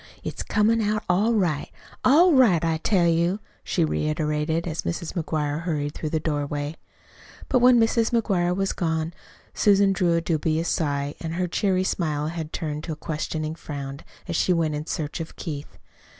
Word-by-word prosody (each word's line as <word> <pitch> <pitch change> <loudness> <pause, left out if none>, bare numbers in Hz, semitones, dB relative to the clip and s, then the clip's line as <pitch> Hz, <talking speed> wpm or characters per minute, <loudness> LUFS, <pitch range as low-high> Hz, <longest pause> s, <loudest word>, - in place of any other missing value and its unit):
It's - - -4
comin' 225 +2 +2
out 215 0 0
all 205 +6 +2
right 170 -8 0 0.3
all 330 +6 +6
right, 205 - +5
I 165 -1 +1
tell 175 +1 +2
you," 170 +4 +2 0.2
she 170 - +1
reiterated, 155 +1 -1
as 160 -1 -2
Mrs. 170 -1 -4
McGuire 155 -2 -2
hurried 150 -4 -2
through 155 - -4
the 160 - 0
doorway. 145 0 -2 0.7
But 255 - +4
when 245 0 +6
Mrs. 225 0 +3
McGuire 190 -7 +1
was 195 0 0
gone 160 -1 -1 0.4
Susan 200 -1 +4
drew 175 -3 +2
a 170 - +1
dubious 160 0 0
sigh; 145 -2 -1
and 165 0 -4
her 180 0 0
cheery 185 +1 +1
smile 155 -5 -1
had 160 -2 -5
turned 150 -1 -4
to 165 - -3
a - - -6
questioning 155 0 -3
frown 140 -4 -6 0.3
as 170 - -3
she 180 - +3
went 165 -3 +1
in 150 +2 -4
search 155 +1 -3
of 160 - -6
Keith. 145 -3 -6
165 Hz, 175 wpm, -25 LUFS, 155-190 Hz, 0.7 s, all